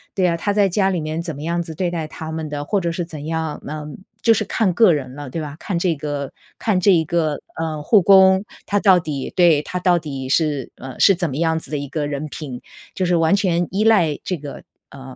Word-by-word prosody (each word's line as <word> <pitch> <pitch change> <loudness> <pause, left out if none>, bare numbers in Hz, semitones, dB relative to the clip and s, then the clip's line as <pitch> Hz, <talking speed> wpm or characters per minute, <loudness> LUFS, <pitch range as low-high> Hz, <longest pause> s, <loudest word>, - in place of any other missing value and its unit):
对 190 - +2
啊， 170 - +1
他 205 +5 -1
在 200 -1 +3
家 190 +1 +1
里 185 -3 -1
面 155 +1 -3
怎 170 -2 -5
么 145 - -8
样 170 +2 -1
子 165 -2 -7
对 175 +1 -1
待 165 -3 -3
他 160 +1 -7
们 160 -1 -4
的， 145 0 -4
或 200 +4 0
者 170 -1 -1
是 170 +1 -3
怎 155 -3 -8
样， 160 -1 -3
嗯， 150 0 -7 0.2
就 230 - +6
是 220 - 0
看 200 -2 0
个 205 -2 +5
人 130 -4 -4
了， 145 -1 -8
对 165 +5 -4
吧？ 145 -1 -7
看 185 - -3
这 170 -1 +1
个 145 -1 -4 0.2
看 210 -5 +1
这 200 +2 +4
一 165 -3 +3
个， 155 -3 0 0.2
呃， 160 -2 -3
护 210 +6 +5
工， 190 +1 +6 0.2
他 205 - +1
到 190 -3 +5
底 145 -5 -5
对， 170 -5 +5
他 180 +4 -5
到 180 -1 +3
底 135 -4 -6
是 145 -1 0
呃， 130 -1 -9
是 195 - +6
怎 175 -2 -2
么 130 - -5
样 160 0 +1
子 - - -13
的 150 - -2
一 140 0 -5
个 145 +1 -3
人 145 +1 -4
品， 140 -4 -7 0.3
就 185 - 0
是 175 0 +2
完 165 +2 +3
全 175 -3 +1
依 200 +3 0
赖 175 -10 +3
这 180 - -2
个 145 -2 -9 0.3
呃， 130 -1 -11
165 Hz, 270 characters per minute, -20 LUFS, 150-185 Hz, 0.3 s, 就